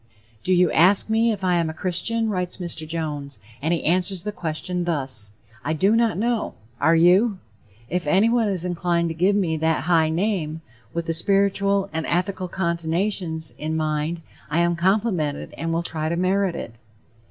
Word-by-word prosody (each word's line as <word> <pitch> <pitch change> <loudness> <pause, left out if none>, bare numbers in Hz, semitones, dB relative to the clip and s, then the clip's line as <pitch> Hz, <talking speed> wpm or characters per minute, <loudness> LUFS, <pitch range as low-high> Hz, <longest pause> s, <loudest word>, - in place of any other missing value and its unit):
"Do 185 - 0
you 180 -2 +4
ask 195 +5 +4
me 225 +1 +3
if 200 -3 -4
I 180 -1 +2
am 165 -2 0
a 160 - -6
'Christian'?" 195 +7 0
writes 180 -2 -2
Mr. 170 -4 -2
Jones, 150 -5 -4 0.2
and 160 +4 0
he 170 - 0
answers 180 +2 +1
the 210 - -3
question 175 0 -3
thus: 135 -10 -1 0.3
"I 155 - -1
do 195 +7 +3
not 230 -6 +2
know. 230 +1 -1 0.2
Are 160 +3 +4
you? 185 +6 +4 0.5
If 175 0 -2
anyone 225 +7 +3
is 185 -3 -1
inclined 170 -1 0
to - - -3
give 185 +5 +2
me 170 -6 +1
that 160 -2 +1
high 160 -1 +3
name, 165 -3 -1 0.3
with 170 +3 -3
the 165 - -1
spiritual 200 +2 +2
and 160 0 -2
ethical 185 +1 -1
connotation 170 0 -1 0.2
in 155 +1 -2
mind, 155 +2 -2 0.3
I 150 - -1
am 170 0 +2
complimented 180 -4 0
and 165 0 -3
will 165 +1 0
try 155 -2 -3
to 170 - -1
merit 185 0 +1
it." 115 - -6
175 Hz, 175 wpm, -23 LUFS, 160-195 Hz, 0.5 s, you